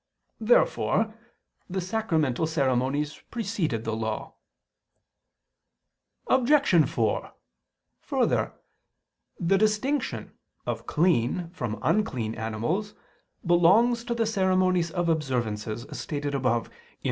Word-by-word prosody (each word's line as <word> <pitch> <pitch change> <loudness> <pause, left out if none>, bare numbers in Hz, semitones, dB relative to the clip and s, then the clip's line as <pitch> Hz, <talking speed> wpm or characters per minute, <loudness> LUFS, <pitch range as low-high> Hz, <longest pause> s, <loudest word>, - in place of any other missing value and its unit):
Therefore 225 - +2 0.6
the 190 +1 -2
sacramental 165 - 0
ceremonies 140 0 0
preceded 195 - -2
the 110 -1 -2
Law. 110 -1 -4 1.9
Obj. 260 - +4
4: 110 -4 -1 0.7
Further, - - 0 0.9
the 190 +3 +2
distinction 215 +7 0 0.3
of - - -4
clean 165 0 +1
from 120 -11 -4
unclean 125 - 0
animals 120 - -2 0.5
belongs 200 +8 +4
to 240 -1 -2
the 230 -1 +1
ceremonies 185 -4 +2
of 175 +1 -1
observances, 120 -8 -1
as - - -8
stated 145 -1 -3
above 125 -4 0
(Q. - - -25
170 Hz, 95 wpm, -27 LUFS, 125-210 Hz, 1.9 s, Obj